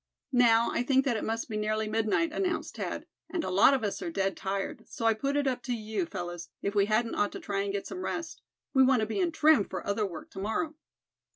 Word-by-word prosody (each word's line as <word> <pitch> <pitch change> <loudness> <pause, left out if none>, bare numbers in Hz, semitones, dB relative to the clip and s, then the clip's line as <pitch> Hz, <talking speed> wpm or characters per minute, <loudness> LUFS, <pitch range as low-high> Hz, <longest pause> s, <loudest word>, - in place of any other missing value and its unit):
"Now, 235 -2 +5
I - - 0
think 265 +2 +3
that 255 -4 +1
it 215 - -2
must 225 +1 -2
be 215 -3 -3
nearly 215 +1 0
midnight," 225 +9 +1
announced 360 0 -2
Thad, - - -4 0.2
"and 345 -3 -2
a - - -2
lot 200 +9 +6
of 260 - -2
us 205 - -2
are 360 - -3
dead 195 -11 0
tired; 195 0 -3
so 230 - -5
I 225 - +5
put 275 +6 -1
it 290 - +1
up 255 -2 0
to 245 -2 -1
you, 215 -5 -3
fellows, 175 -2 -6
if 200 - -1
we 200 -1 +3
hadn't 225 +2 +1
ought 205 - 0
to - - -5
try 195 -1 -2
and 200 0 -2
get 200 0 -3
some 370 0 -6
rest? 330 0 -4 0.3
We 265 - +5
want 260 -3 +5
to - - +1
be 220 - -3
in 355 -3 +2
trim 310 -7 +5
for 185 -2 -5
other 200 +1 0
work 170 -4 -9
to 190 - -8
morrow." 225 +11 -1
220 Hz, 255 wpm, -29 LUFS, 200-270 Hz, 0.3 s, lot